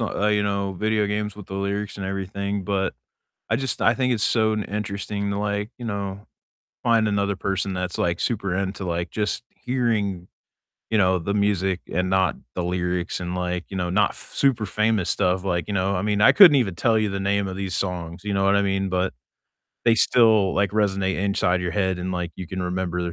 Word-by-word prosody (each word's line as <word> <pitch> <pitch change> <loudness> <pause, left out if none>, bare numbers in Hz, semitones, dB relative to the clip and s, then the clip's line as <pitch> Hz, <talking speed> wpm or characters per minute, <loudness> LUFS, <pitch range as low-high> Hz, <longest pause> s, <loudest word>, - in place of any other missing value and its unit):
uh, 105 -2 -1
you 105 -1 +2
know, 100 -1 -1
video 105 +2 +1
games 105 0 -2
with 105 - -10
the 95 - -7
lyrics 100 +1 -2
and 95 -1 -4
everything, 100 +1 -3
but 95 -1 -1 0.5
I 110 - +2
just 135 0 -2
I 115 - +4
think 125 +2 +1
it's 110 -3 0
so 110 -2 +2
interesting 100 -1 -3
to 100 - -2
like, 105 +1 -2
you 120 - -7
know, 100 -1 -4 0.6
find 115 -2 +3
another 100 -1 0
person 95 0 -2
that's 90 -1 -3
like 85 0 0
super 100 -6 -1
into 95 0 -3
like 85 0 -2
just 105 +2 -2
hearing, 110 -8 -1 0.6
you 110 - +2
know, 95 -2 +3
the 100 +4 -2
music 95 -3 +1
and 90 +2 0
not 95 -4 +2 0.2
the 90 - -2
lyrics 90 0 -1
and 90 0 -4
like, 90 0 -2
you 95 - -6
know, 90 -1 -1
not 100 +2 +3
f - - -12
super 125 -6 +2
famous 105 -2 +1
stuff. 90 +1 +1
Like, 85 -3 -1
you 105 - -3
know, 95 0 +1
I 90 - -1
mean, 105 0 0
I - - +8
couldn't 175 -8 +9
even 100 -9 +1
tell 115 +5 +2
you 110 -1 +1
the 100 - -3
name 100 0 0
of 95 - -5
these 95 -2 -3
songs, 85 -2 -3
you 105 - -2
know 95 - +1
what 100 +1 +4
I 100 - +3
mean? 95 0 0
But 90 0 0 0.7
they 115 - +5
still 110 -5 +4
like 100 0 +2
resonate 95 -2 +1
inside 95 -2 +1
your 90 -1 -2
head 95 0 0
and 90 +1 -3
like 90 -2 -3
you 90 - -7
can 95 +2 -4
remember, 90 0 -2
100 Hz, 215 wpm, -24 LUFS, 90-105 Hz, 0.7 s, couldn't